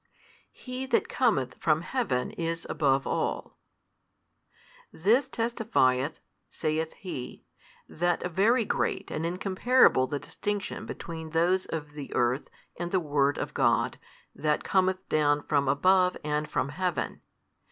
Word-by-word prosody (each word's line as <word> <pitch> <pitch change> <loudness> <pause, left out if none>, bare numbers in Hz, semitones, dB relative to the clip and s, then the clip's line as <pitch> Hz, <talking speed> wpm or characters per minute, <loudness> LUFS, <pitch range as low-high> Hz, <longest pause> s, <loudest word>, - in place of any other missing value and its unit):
He 255 +1 -6
that - - +2
cometh 140 - +1
from 155 -1 +2
heaven 190 - -1
is 165 0 -3
above 140 -3 +1
all. - - -2 1.3
This 220 - +2
testifieth 210 - +1 0.3
(saith 160 0 -2
he) 155 -10 -7 0.4
that 175 +2 -1
very 225 +7 +3
great - - -1
and 160 +2 -2
incomparable 190 - +3
the 145 - -2
distinction 205 +6 -4
between 160 -1 -6
those 175 +4 +2
of 150 -2 -5
the 145 -2 -8
earth 120 +3 +1 0.3
and 175 0 -2
the 185 - +2
Word 145 -3 +1
of - - -4
God - - +2 0.3
That 150 -1 0
cometh 190 0 +1
down 145 -1 +2
from 140 -2 +1
above 180 +6 +3
and 150 0 -1
from 135 - -1
Heaven. 180 +3 -2
165 Hz, 125 wpm, -28 LUFS, 145-190 Hz, 1.3 s, very